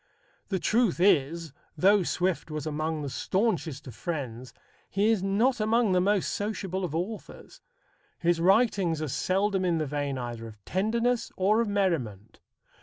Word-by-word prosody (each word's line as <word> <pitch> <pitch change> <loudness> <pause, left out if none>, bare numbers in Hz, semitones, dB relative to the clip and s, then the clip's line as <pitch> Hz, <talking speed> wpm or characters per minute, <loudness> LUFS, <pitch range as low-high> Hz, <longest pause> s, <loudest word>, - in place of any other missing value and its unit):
The 195 - 0
truth 210 +1 +1
is, 165 -3 +2 0.2
though 200 +5 +5
Swift 180 -1 -1
was 155 -2 -4
among 155 0 -2
the - - -3
staunchest 185 - -1
of 125 - -9
friends, 125 -1 -5 0.4
he 205 +3 +2
is 220 -4 +1
not 220 +7 +1
among 220 0 +2
the 180 -1 +3
most 200 0 +1
sociable 195 -3 -3
of 165 -4 -3
authors. 195 +6 -6 0.6
His 170 -1 +1
writings 195 -4 +3
are - - -2
seldom 190 +6 0
in 175 -2 +1
the 155 - -1
vein 145 -1 -2
either 120 -2 -5
of 105 -2 -14
tenderness 230 +5 0
or 210 +4 +3
of 230 - -1
merriment. 135 - -1
180 Hz, 155 wpm, -28 LUFS, 150-205 Hz, 0.6 s, though